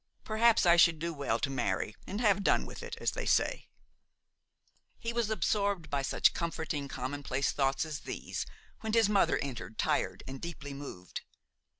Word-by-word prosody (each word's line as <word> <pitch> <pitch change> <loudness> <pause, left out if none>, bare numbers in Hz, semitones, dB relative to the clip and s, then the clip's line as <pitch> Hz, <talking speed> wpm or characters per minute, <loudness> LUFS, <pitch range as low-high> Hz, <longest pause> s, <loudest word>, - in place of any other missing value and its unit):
Perhaps 225 0 +4
I 170 0 +7
should 165 -1 +6
do 170 +2 -3
well 140 -6 0
to 135 - -1
marry 105 -4 -1
and 200 +3 -3
have 205 -3 +3
done - - +3
with - - -9
it, 470 0 -6
as - - +1
they - - -4
say–" - - +2 1.3
He 230 0 -3
was 235 -2 0
absorbed 200 -4 0
by 140 -1 +1
such 135 - +3
comforting, 160 -4 -2
commonplace 135 +1 -2
thoughts 135 +2 +1
as 155 -2 -5
these, - - -5 0.3
when 220 -1 -3
his 225 -2 +5
mother 205 -2 +3
entered, 125 -5 -6
tired - - 0
and 135 0 -7
deeply 155 -4 -6
moved. 135 -11 -7
160 Hz, 170 wpm, -31 LUFS, 135-205 Hz, 1.3 s, I